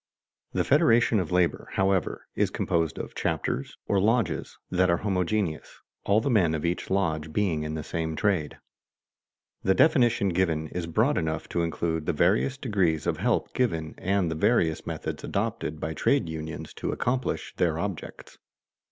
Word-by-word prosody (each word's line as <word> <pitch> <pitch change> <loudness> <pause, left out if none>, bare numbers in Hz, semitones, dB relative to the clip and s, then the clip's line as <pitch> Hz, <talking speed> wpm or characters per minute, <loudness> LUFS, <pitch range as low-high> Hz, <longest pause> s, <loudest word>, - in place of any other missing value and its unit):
The - - +1
Federation 120 -7 +4
of 90 -3 -3
Labor, 90 -1 +1
however, 95 -2 0
is - - +1
composed 80 -2 -1
of - - -6
chapters, 65 - -2
or 100 - +2
lodges, 115 +3 0
that 90 0 +3
are 85 - +3
homogeneous, 95 -3 -1 0.3
all 100 +2 +4
the 115 - -3
men 90 -8 +3
of 80 - -3
each 85 +1 -2
lodge 80 -5 0
being 85 -4 0
in 75 0 -3
the 80 - -4
same 80 -1 -3
trade. 85 -6 0 1.0
The 95 - +2
definition 120 - +4
given 85 -4 0
is 90 -2 -4
broad 110 - +2
enough 80 -1 -2
to 85 - 0
include 80 -1 -2
the 90 - +2
various 100 - +2
degrees 95 - 0
of - - 0
help - - 0
given 80 -11 -1
and 95 -3 +1
the - - -2
various 80 -2 +1
methods - - -4
adopted 75 0 -2
by 80 - -3
trade 80 - +1
unions 80 0 -6
to - - -2
accomplish 125 +1 -2
their 80 -3 +1
objects. 95 -1 -6
90 Hz, 160 wpm, -27 LUFS, 80-105 Hz, 1.0 s, Federation